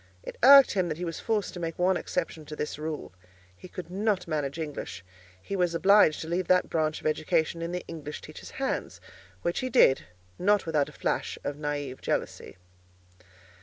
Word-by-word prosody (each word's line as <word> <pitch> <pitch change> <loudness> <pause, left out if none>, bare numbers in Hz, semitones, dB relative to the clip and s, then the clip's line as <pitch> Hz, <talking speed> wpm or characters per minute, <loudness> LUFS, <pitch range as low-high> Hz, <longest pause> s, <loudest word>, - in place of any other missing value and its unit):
It - - -7
irked 275 +1 +9
him 185 -3 0
that 155 - -3
he 180 - -4
was 165 - -4
forced 215 -3 -1
to 180 - -7
make 165 -1 -4
one 185 +1 +3
exception 165 -3 -3
to 150 - -7
this 150 0 -4
rule. 155 -1 -5 0.4
He 135 - -12
could 175 -1 -8
not 200 -1 0
manage 145 -2 -2
English: 150 - -6 0.3
he 195 - -5
was 175 -2 +1
obliged 190 -3 +5
to 160 - -6
leave 175 +2 -1
that 180 0 +3
branch 155 -1 0
of - - -18
education 160 +2 0
in 170 +1 -3
the 180 0 -4
English 150 -3 -7
teacher's - - -10
hands; - - -2 0.4
which 170 - 0
he 255 - -2
did, 230 - +5 0.3
not 205 +2 +3
without 155 -3 +1
a - - -12
flash - - -2
of 145 - -3
naïve 145 -3 -4
jealousy. - - -3
165 Hz, 190 wpm, -28 LUFS, 150-185 Hz, 0.4 s, irked